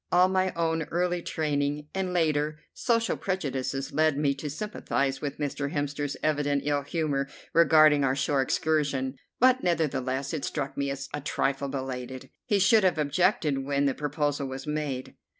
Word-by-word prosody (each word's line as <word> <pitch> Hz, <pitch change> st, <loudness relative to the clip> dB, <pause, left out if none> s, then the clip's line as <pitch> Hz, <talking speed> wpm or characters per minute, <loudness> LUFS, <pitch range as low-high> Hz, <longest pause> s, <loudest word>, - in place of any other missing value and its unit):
All 180 Hz, +1 st, +5 dB
my 185 Hz, 0 st, +1 dB
own 165 Hz, -1 st, 0 dB
early 175 Hz, +1 st, 0 dB
training 145 Hz, -2 st, -1 dB
and 190 Hz, -1 st, -1 dB
later 155 Hz, -3 st, +1 dB
social 230 Hz, -2 st, +1 dB
prejudices 135 Hz, -7 st, -3 dB
led 155 Hz, -1 st, +2 dB
me 145 Hz, -1 st, +2 dB
to 140 Hz, +2 st, -6 dB
sympathize 140 Hz, -6 st, -2 dB
with 145 Hz, -1 st, -4 dB
Mr. 145 Hz, -1 st, -2 dB
Hemster's 145 Hz, -1 st, -2 dB
evident 145 Hz, -2 st, +1 dB
ill 145 Hz, -1 st, +1 dB
humour 145 Hz, -2 st, -1 dB, 0.3 s
regarding 155 Hz, -3 st, +6 dB
our 130 Hz, -1 st, +2 dB
shore 140 Hz, -1 st, +1 dB
excursion, 140 Hz, -2 st, 0 dB, 0.2 s
but 255 Hz, +1 st, +5 dB
nevertheless 140 Hz, -5 st, 0 dB
it 155 Hz, -, -3 dB
struck 140 Hz, -3 st, -3 dB
me 140 Hz, 0 st, -1 dB
as 140 Hz, 0 st, -4 dB
a 145 Hz, -, -3 dB
trifle 140 Hz, -1 st, -1 dB
belated. 130 Hz, -1 st, -5 dB, 0.2 s
He 210 Hz, -4 st, +3 dB
should 210 Hz, +2 st, +5 dB
have 185 Hz, -3 st, +3 dB
objected 150 Hz, -1 st, +1 dB
when 140 Hz, +1 st, 0 dB
the 135 Hz, -, +2 dB
proposal 145 Hz, -1 st, -1 dB
was 130 Hz, 0 st, -6 dB
made. 150 Hz, -4 st, -3 dB
145 Hz, 160 wpm, -27 LUFS, 140-160 Hz, 0.3 s, regarding